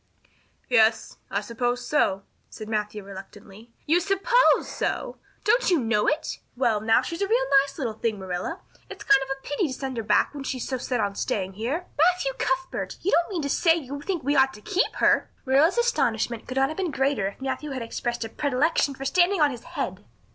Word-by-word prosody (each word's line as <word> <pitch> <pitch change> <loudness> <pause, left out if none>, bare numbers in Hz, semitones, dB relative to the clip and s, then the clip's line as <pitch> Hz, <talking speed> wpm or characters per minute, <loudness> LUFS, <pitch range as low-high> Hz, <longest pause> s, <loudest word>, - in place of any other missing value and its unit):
"Yes, 225 -2 +3
I 200 - -1
suppose 245 +3 -2
so," 195 -10 +1 0.3
said 215 - -9
Matthew 210 -1 -3
reluctantly. 200 +3 -12
"You 330 +4 +4
suppose 400 +7 +3
so! - - -3 0.2
Don't 485 +2 +3
you 355 - +4
know 225 -4 +1
it?" 300 - -1 0.2
"Well 235 -5 +1
now, 225 +1 +3
she's 335 +3 -5
a 395 - +1
real 480 +4 +2 0.2
nice 275 0 -7
little 245 -7 -2
thing, 220 0 -2
Marilla. 190 - -4 0.3
It's - - -9
kind 410 -1 +5
of 270 - -5
a 270 0 -4
pity 290 +5 0
to 265 - -5
send 265 -2 -5
her - - 0
back 210 +5 +2
when 285 -2 -6
she's 260 -2 -4
so 260 -2 -2
set 245 0 -2
on 200 -2 0
staying 195 -1 -2
here." 255 - -3
"Matthew 360 +9 +3
Cuthbert, 355 0 -2
you 390 - +1
don't 340 +1 +3
mean 350 -6 -3
to 280 - -2
say 330 +3 +4
you 285 -3 -6
think 355 -2 -3
we 285 +3 +1
ought 265 -2 +4
to 210 - -13
keep 380 - 0
her!" - - +3 0.2
Marilla's 280 - +4
astonishment 235 - 0
could 255 - -5
not 270 0 +3
have 315 - -6
been 375 -3 -1
greater 270 -7 0
if 200 - -8
Matthew 265 +3 -3
had 260 -3 -4
expressed 235 0 -3
a - - -7
predilection 285 +2 +1
for 270 - -7
standing 360 +6 +3
on 295 -2 +4
his 245 -3 -8
head. 285 - -4
270 Hz, 210 wpm, -25 LUFS, 225-330 Hz, 0.3 s, kind